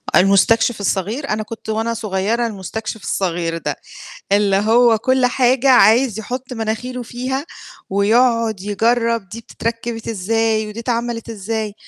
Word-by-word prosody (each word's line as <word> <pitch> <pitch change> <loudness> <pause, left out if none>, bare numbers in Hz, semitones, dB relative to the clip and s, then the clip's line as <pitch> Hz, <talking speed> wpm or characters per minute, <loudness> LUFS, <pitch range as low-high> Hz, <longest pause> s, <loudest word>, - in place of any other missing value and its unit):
المستكشف 215 +5 +4
الصغير، 210 - -2
أنا 215 0 -1
كنت 220 0 -9
وأنا 225 +1 -1
صغيرة 220 +2 -1
المستكشف 215 +1 -6
الصغير 170 -3 -1
ده، 150 -3 -3 0.6
اللي 200 -1 +3
هو 225 +3 +4
كل 260 +2 +2
حاجة 255 +1 +2
عايز 230 -1 +5
يحُط 250 +4 -5
مناخيره 240 +2 -3
فيها، 255 +4 -4 0.5
ويقعد 225 +1 +2
يجرّب 230 +1 0
دي 230 - -8
بتتركب 230 0 -5
إزاي 220 +1 0
ودي 210 +2 -7
اتعملت 235 -1 -3
إزاي، 215 0 -4
225 Hz, 125 wpm, -19 LUFS, 205-240 Hz, 0.6 s, عايز